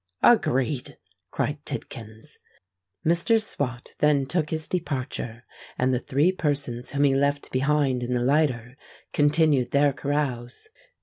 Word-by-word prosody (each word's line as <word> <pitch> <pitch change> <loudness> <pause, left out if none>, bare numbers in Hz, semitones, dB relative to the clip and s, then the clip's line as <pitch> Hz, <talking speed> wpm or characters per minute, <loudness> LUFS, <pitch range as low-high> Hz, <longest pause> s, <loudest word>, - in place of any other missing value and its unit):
"Agreed!" 135 - +2 0.3
cried - - -2
Tidkins. 110 -1 -7 0.7
Mr. 170 +8 +4
Swot 125 - -4
then 145 -2 +3
took 155 +2 -1
his 155 -1 -1
departure; 130 -8 -4 0.3
and 130 +1 +1
the 125 - +1
three 145 +8 +2
persons 140 -8 -2
whom 140 0 0
he 140 -1 +4
left 140 +1 0
behind 135 -1 +1
in 120 +1 -2
the 120 -1 0
lighter, 130 -3 +1 0.4
continued 145 -3 +3
their 140 0 +3
carouse. 140 - -3
140 Hz, 125 wpm, -25 LUFS, 125-150 Hz, 0.7 s, Mr